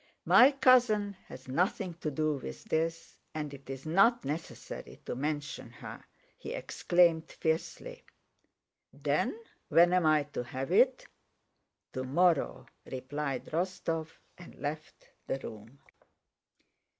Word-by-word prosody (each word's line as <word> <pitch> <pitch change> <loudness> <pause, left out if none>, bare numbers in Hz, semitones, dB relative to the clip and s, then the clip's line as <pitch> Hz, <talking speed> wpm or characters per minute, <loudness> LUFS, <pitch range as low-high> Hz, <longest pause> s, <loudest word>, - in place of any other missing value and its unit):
"My 260 +3 +8
cousin 240 -7 +4
has - - -11
nothing 180 +6 0
to 155 - -1
do 155 +1 0
with 65 - -8
this 165 +1 -2 0.2
and 150 -2 -4
it's 135 0 -8
not 195 +9 +4
necessary 155 +4 -6
to - - -3
mention 145 +2 -3
her!" - - -9 0.4
he 470 -1 -6
exclaimed 175 - +2
fiercely. 170 - -3 0.9
"Then 445 - -1 0.3
when 175 +1 +6
am 180 -3 +3
I 155 -1 +4
to 145 -3 -5
have 130 +5 -5
it?" 255 +7 +4 0.9
"Tomorrow," 145 +6 +1 0.3
replied 135 +1 -3
Rostóv 165 -2 -2 0.3
and 175 - -12
left 155 +4 -6 0.2
the - - -1
room. 110 0 -10
160 Hz, 115 wpm, -31 LUFS, 140-185 Hz, 0.9 s, My